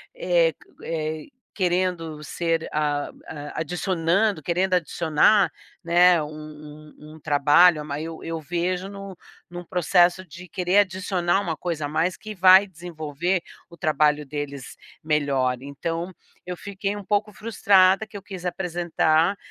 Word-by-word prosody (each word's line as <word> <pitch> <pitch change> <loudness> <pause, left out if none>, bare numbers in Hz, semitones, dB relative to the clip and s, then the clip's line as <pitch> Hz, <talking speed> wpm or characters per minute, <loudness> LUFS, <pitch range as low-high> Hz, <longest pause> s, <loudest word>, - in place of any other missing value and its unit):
eh, - - +2
qu - - -24
eh, 155 -1 -4 0.3
querendo 175 -4 -1
ser 165 +1 -2
a 145 -1 -1 0.2
a 145 0 -6
adicionando, 180 +2 0
querendo 185 +2 0
adicionar, 170 +3 +3 0.3
né, 175 0 +5
um 150 0 -11
um 155 +1 -13
um - - -14
trabalho, 150 +3 +5
eu 150 - -6
ma 145 -1 -4
eu 165 0 -6
vejo 180 +4 -2
num 195 -1 -8 0.4
num 175 0 -8
processo, 180 +1 +2
de 175 +1 -12
querer 180 +4 +2
adicionar 185 -1 0
uma 165 -5 -3
coisa 160 -4 -3
a - - -4
mais, 170 +4 0
que 215 -1 -9
vai 190 +2 +7
desenvolver 170 0 -3 0.3
o 170 - -15
trabalho 150 -1 +1
deles 140 -2 -6 0.3
melhor. 140 -5 0
Então, 165 +6 -4 0.3
eu 180 -1 -5
fiquei 200 0 -4
um 200 - -9
pouco 210 0 0
frustrada, 195 -2 +3
que 210 - -9
eu - - -9
quis 185 -2 -9
apresentar, 175 0 +1
170 Hz, 140 wpm, -24 LUFS, 155-185 Hz, 0.4 s, vai